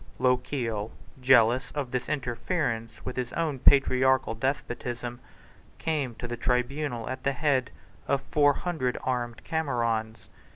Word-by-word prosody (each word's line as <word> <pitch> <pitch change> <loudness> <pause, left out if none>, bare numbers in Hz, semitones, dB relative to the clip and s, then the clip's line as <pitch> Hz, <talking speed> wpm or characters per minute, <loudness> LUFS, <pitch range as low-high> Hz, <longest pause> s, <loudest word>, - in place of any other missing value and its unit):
Lochiel, 125 -4 0 0.3
jealous 125 0 +5
of 140 -4 -3
this 125 +1 -2
interference 120 -4 -2
with 125 - -4
his 125 -1 -2
own 155 -5 -1
patriarchal 130 -3 +4
despotism, 120 -1 -3 0.6
came 145 -7 -1
to 120 - -5
the 120 - -3
tribunal 125 +1 -1
at 130 +1 -5
the 140 - +1
head 135 -1 +1 0.4
of 140 - +2
four 145 0 +3
hundred 145 -7 -2
armed 120 -3 -2
Camerons. 115 -8 -1
125 Hz, 125 wpm, -28 LUFS, 120-140 Hz, 0.6 s, jealous